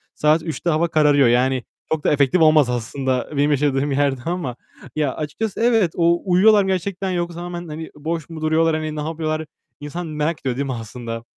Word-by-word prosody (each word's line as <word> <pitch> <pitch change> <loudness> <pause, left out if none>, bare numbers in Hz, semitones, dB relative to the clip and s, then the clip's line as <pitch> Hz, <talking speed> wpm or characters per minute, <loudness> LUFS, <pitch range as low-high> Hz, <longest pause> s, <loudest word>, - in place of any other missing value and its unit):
saat 155 +2 +2
3'te 165 +1 -3
hava 165 +1 +2
kararıyor. 150 -4 +4
Yani, 125 +1 +2 0.3
çok 155 -1 -2
da - - +2
efektif 145 +3 +3
olmaz 155 -4 +5
aslında 125 +2 -2
benim 145 +1 +3
yaşadığım 145 0 +1
yerde 135 -2 +1
ama. 170 -8 -3 0.4
Ya, 150 -4 0
açıkçası 170 +7 -4
evet, 225 -7 +3
o 170 0 +2
uyuyorlar 200 +3 +5
mı - - -3
gerçekten 190 +1 -2
yoksa 175 -1 -3
hemen, 175 -1 -6
hani, 160 +1 -7
boş 160 +1 -4
mu 160 -2 -8
duruyorlar? 160 +1 +2
Hani, 155 -1 -3
ne 150 - -3
yapıyorlar? 155 0 -3 0.3
İnsan 165 +4 -6
merak 155 +1 -2
ediyor 130 -2 -2
değil 140 - -1
mi 135 - -3
aslında? 115 0 -6
155 Hz, 190 wpm, -21 LUFS, 140-170 Hz, 0.4 s, olmaz